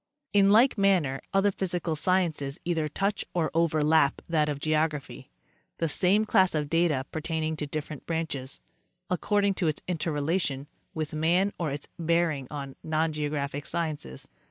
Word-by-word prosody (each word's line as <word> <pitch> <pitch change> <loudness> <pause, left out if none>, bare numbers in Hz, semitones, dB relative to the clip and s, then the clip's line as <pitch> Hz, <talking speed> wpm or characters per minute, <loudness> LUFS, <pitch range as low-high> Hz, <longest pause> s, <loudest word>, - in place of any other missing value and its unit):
In 200 -1 +5
like 225 +3 +5
manner 175 -9 +2
other 195 +1 +3
physical 175 -4 -1
sciences 155 -4 0
either 165 -3 0
touch 200 +6 -1
or 165 -3 +1
overlap 155 -3 +3
that 155 -3 +1
of 145 -1 -3
geography, 155 -1 -1 0.5
the 165 - 0
same 190 +7 +3
class 190 -4 +3
of 150 -1 -2
data 165 -5 +2
pertaining 160 0 -2
to 150 - -3
different 150 0 -6
branches, 155 - -3 0.5
according 200 +2 +2
to 180 -3 -1
its 155 - -1
interrelation 155 -3 -1 0.3
with 155 -2 -3
man 175 +6 +2
or 165 -3 -1
its 140 +1 -5
bearing 165 -5 +1
on 140 -2 -6
non 160 0 0
geographic 145 -1 -3
sciences. 155 - -4
160 Hz, 145 wpm, -28 LUFS, 150-175 Hz, 0.5 s, In